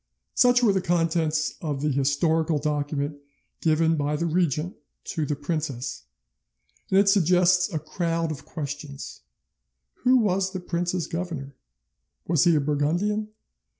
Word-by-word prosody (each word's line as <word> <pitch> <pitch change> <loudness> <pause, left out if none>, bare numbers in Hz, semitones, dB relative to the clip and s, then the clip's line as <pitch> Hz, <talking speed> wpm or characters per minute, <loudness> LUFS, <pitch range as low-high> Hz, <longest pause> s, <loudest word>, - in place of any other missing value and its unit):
'" - - -55
Such 245 0 +4
were 210 -4 +5
the 190 - +1
contents 165 -3 +1
of 145 -4 -3
the 150 - +2
historical 150 +4 +1
document 145 0 -2 0.4
given 160 0 +2
by 145 +1 0
the 170 - -1
regent 170 0 0 0.3
to 155 -3 -3
the 150 - -1
princess, 145 -4 -4 0.8
and 190 - +3
it 200 0 +5
suggests 180 -1 +4
a 165 - -1
crowd 165 +1 -2
of 150 - -7
questions. 145 - -7 0.8
Who 255 +1 +4
was 195 -4 +1
the 185 - -3
prince's 175 0 -2
governor? 165 -6 -5 0.7
Was 160 -4 +3
he 170 -2 +5
a - - +4
Burgundian? 165 +9 0
165 Hz, 140 wpm, -25 LUFS, 150-180 Hz, 0.8 s, were